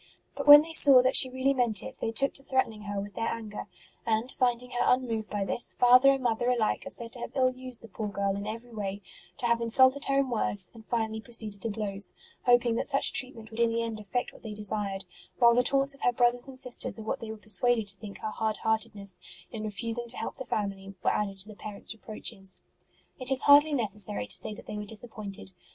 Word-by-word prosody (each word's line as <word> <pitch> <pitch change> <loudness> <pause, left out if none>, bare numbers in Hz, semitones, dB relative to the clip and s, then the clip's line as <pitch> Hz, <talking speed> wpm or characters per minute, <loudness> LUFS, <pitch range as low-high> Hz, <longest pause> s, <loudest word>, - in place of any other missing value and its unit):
But - - -5
when 290 +1 +11
they 325 +1 -9
saw 275 -5 +8
that 255 - +2
she 260 - +5
really 260 +2 0
meant 235 -6 +1
it, - - -9
they 225 - -1
took 275 +4 +3
to - - -2
threatening 260 -6 -1
her 205 -1 -3
with 200 +1 -7
their 225 - -2
anger; 215 -3 -5 0.4
and, 225 +3 +1
finding 250 -1 -1
her 245 - -4
unmoved 230 -4 0
by 205 -1 -2
this, 240 - -2
father 250 +2 +6
and 270 -1 -2
mother 240 +1 0
alike 235 -4 0
are - - -5
said 230 -1 -2
to 245 - -10
have - - -7
ill 255 -1 +3
used 255 -2 -5
the - - -10
poor 215 +1 -5
girl 200 -1 -1
in 200 +1 -5
every 230 +2 -7
way, 200 -2 -5 0.3
to - - -3
have 235 0 +2
insulted 260 +4 +5
her 275 0 +1
in 275 -2 +1
words, 205 -4 -2
and 225 -2 -15
finally 220 -2 -2
proceeded 220 -4 -1
to 225 - -2
blows, 205 -2 -3 0.3
hoping 245 -1 +4
that - - -1
such 275 -1 +2
treatment 230 -4 -3
would 220 - -8
in 235 -1 +3
the 230 0 -1
end 225 -2 -4
effect 230 +4 -3
what - - -16
they 215 -2 -7
desired; 205 -2 -2 0.3
while 235 -1 +6
the 245 - +4
taunts 275 +2 +1
of 275 - -18
her 245 - +3
brothers 245 +1 +2
and 265 -1 -10
sisters 250 -2 -2
at 220 - -8
what - - -2
they 225 - -8
were 220 - -6
persuaded 215 +2 +2
to 200 - -3
think 200 +1 -10
her 215 - -3
hard 220 0 -2
heartedness 220 -3 0 0.3
in 220 - -6
refusing 230 +3 +1
to 235 - -4
help - - -5
the 260 - -5
family 195 -3 -4
were - - +2
added 200 -2 -2
to 195 +2 +1
the 215 - -10
parents 210 +1 -7
reproaches. 215 -3 -4 0.6
It 255 0 -1
is 265 -1 +3
hardly 290 +1 +6
necessary 205 - -2
to 105 - -3
say 215 -1 -4
that - - -13
they 210 - -6
were 210 - -6
disappointed. 210 - -7
225 Hz, 240 wpm, -28 LUFS, 210-250 Hz, 0.6 s, when